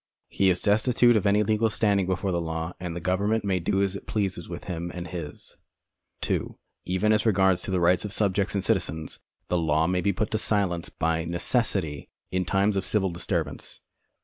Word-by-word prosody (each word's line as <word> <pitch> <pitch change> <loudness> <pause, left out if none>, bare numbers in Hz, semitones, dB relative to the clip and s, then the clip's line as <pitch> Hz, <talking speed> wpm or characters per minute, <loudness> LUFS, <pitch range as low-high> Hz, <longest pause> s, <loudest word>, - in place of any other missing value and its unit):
He 95 - +2
is 90 -1 +1
destitute 120 +3 +4
of 105 -1 +2
any 105 +1 +4
legal 110 +1 +2
standing 100 -4 +1
before 95 +1 -1
the 85 -1 0
law, 80 +1 -3
and 90 -2 -5
the - - -3
government 100 +5 0
may 95 -2 +1
do 95 +3 +1
as 100 0 -1
it - - -8
pleases 95 -5 -2
with 85 - -6
him 85 -2 -4
and 90 -1 -5
his. 80 -4 -7 0.6
(2) - - -2 0.3
Even 95 +4 +2
as 105 0 +2
regards 95 -4 +3
the 95 -1 -1
rights 90 +1 +3
of 105 - -5
subjects 100 -1 +1
and 100 - 0
(iitizens, 80 -1 -2 0.3
the 90 - +1
law 80 -1 +2
may 90 +1 +1
bo 100 - +2
put 105 +4 -2
to 110 - 0
silence 95 -6 0
by 80 0 -1
necessitij 85 - -1 0.2
in 95 0 0
times 100 +3 +2
of 95 - 0
civil 95 -1 0
disturbance. 85 - -3
95 Hz, 195 wpm, -26 LUFS, 85-105 Hz, 0.6 s, destitute